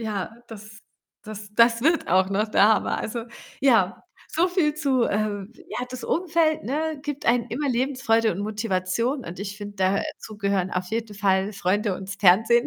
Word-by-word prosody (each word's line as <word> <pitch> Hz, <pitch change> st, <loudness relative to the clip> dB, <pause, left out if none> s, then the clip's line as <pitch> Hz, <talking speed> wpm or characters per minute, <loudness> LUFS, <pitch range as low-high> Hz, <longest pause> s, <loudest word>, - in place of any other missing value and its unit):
ja, 215 Hz, -1 st, -4 dB
das 215 Hz, -1 st, -11 dB, 0.4 s
das 210 Hz, -1 st, -8 dB
das 230 Hz, +1 st, +4 dB
wird 325 Hz, +3 st, +2 dB
auch 185 Hz, +1 st, +3 dB
noch 210 Hz, +3 st, 0 dB
der 210 Hz, -1 st, +5 dB
Hammer. 220 Hz, -, +2 dB
Also, 230 Hz, +1 st, -4 dB, 0.4 s
ja, 230 Hz, -9 st, +3 dB, 0.3 s
so 350 Hz, +3 st, +1 dB
viel 340 Hz, -5 st, +1 dB
zu, 275 Hz, -5 st, +1 dB
ähm 205 Hz, 0 st, -2 dB, 0.2 s
ja, -, -, -3 dB
das 255 Hz, -, -6 dB
Umfeld, 330 Hz, -, +1 dB
ne, 305 Hz, +5 st, -2 dB
gibt 290 Hz, -1 st, -5 dB
einem 235 Hz, 0 st, +3 dB
immer 280 Hz, +5 st, -2 dB
Lebensfreude 245 Hz, -3 st, +1 dB
und 175 Hz, -, -6 dB
Motivation 215 Hz, +4 st, -1 dB
und 170 Hz, -, -8 dB
ich 200 Hz, +1 st, -5 dB
finde, 205 Hz, -1 st, -8 dB
da 190 Hz, +1 st, +1 dB
dazu 215 Hz, -, -11 dB
gehören 200 Hz, -3 st, 0 dB
auf 180 Hz, 0 st, -2 dB
jeden 225 Hz, 0 st, -3 dB
Fall 195 Hz, 0 st, +1 dB
Freunde 200 Hz, +2 st, 0 dB
und's 195 Hz, +1 st, -7 dB
Fernsehen 220 Hz, +6 st, +5 dB
220 Hz, 175 wpm, -24 LUFS, 200-255 Hz, 0.4 s, der